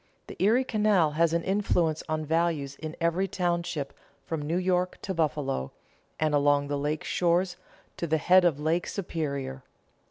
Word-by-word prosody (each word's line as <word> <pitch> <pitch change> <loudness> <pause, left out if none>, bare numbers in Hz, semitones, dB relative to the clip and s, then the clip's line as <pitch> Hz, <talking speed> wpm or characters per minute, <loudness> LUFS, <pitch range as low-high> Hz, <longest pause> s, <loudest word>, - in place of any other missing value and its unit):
The - - -9
Erie 230 +6 +4
Canal 210 -9 +2
has 165 +2 +2
an 170 0 0
influence 180 -5 +1
on 155 0 -1
values 160 -3 0
in 155 0 -6
every 170 +3 +1
township 170 -6 -2 0.3
from 160 -2 -3
New 155 +4 -1
York 180 0 0
to 190 - -2
Buffalo, 145 - -1 0.5
and 155 -1 +1
along 145 0 +3
the 145 - -1
lake 150 +2 -2
shores 175 +1 +1 0.4
to 170 - -2
the 160 0 +2
head 180 +4 +5
of 165 -5 +2
Lake 160 +3 0
Superior. 140 -8 -4
165 Hz, 160 wpm, -28 LUFS, 150-180 Hz, 0.5 s, head